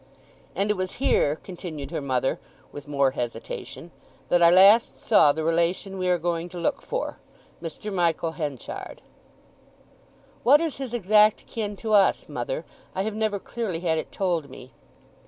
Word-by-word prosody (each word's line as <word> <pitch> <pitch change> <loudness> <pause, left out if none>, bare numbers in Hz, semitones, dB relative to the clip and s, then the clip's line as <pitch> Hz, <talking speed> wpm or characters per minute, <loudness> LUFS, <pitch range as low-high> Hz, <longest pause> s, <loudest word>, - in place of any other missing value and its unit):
"And 200 +2 +1
it 210 - -1
was 185 0 -3
here," 150 - +2
continued 165 -5 -8
her 165 - -3
mother, 130 -1 -1 0.3
with 145 0 -10
more 140 -2 +2
hesitation, 120 +7 -6 0.4
"that 175 - +3
I 170 - +8
last 195 +6 +6
saw 200 -10 +5
the 160 +2 -3
relation 170 +4 0
we 185 0 0
are 180 - +3
going 170 0 -2
to 180 - -9
look 170 - -1
for—Mr. 210 - -7
Michael 170 -2 +1
Henchard." 150 -5 -6 1.4
"What 285 +4 +6
is 325 -3 -2
his 260 -3 -5
exact 215 0 +4
kin 210 -3 -4
to 215 +2 -3
us, 200 -2 +4
mother? - - -4 0.3
I 190 - 0
have 215 +1 -3
never 215 -1 -1
clearly 195 -5 -4
had 160 -3 +1
it - - -7
told 170 -7 -1
me." 130 0 -12
180 Hz, 155 wpm, -25 LUFS, 160-210 Hz, 1.4 s, I